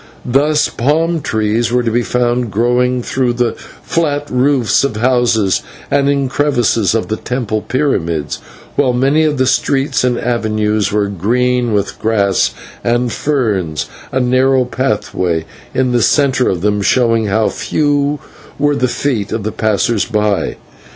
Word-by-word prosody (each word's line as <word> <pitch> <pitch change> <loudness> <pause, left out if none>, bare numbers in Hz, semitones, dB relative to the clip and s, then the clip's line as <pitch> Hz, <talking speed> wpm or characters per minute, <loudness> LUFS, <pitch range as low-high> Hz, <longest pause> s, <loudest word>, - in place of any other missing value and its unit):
Thus 150 +4 +2
palm 160 +6 0
trees 110 0 0
were 125 0 +2
to 115 - 0
be 120 +2 +1
found 120 0 0
growing 125 +3 +1
through 125 -1 0
the 120 -1 0 0.3
flat 145 -3 -1
roofs 130 -2 +2
of 140 -6 -1
houses, 115 -4 +2 0.3
and 140 0 +2
in 140 -1 +1
crevices 120 -7 +1
of 115 - -1
the 110 - -2
temple 115 -4 -2
pyramids, 85 - -1 0.4
while 130 -3 +2
many 135 +5 +2
of 150 -2 0
the 130 - +2
streets 135 +1 +1
and 125 -1 +1
avenues 110 -3 0
were 105 0 +1
green 120 +5 0
with 100 -2 -1
grass 100 -4 +1 0.3
and 120 0 +1
ferns, 105 - -1 0.3
a 130 - 0
narrow 130 +1 +2
pathway 105 -9 -1 0.3
in 130 -1 0
the 120 -1 +2
centre 130 +1 +2
of 90 -3 -2
them 105 +1 +1
showing 115 0 +2
how 105 +2 +1
few 145 -1 0 0.4
were 145 0 +1
the 125 - +1
feet 120 -5 -2
of 110 -2 -2
the 110 - -2
passers 110 0 0
by. 105 -2 0
120 Hz, 150 wpm, -15 LUFS, 110-135 Hz, 0.4 s, Thus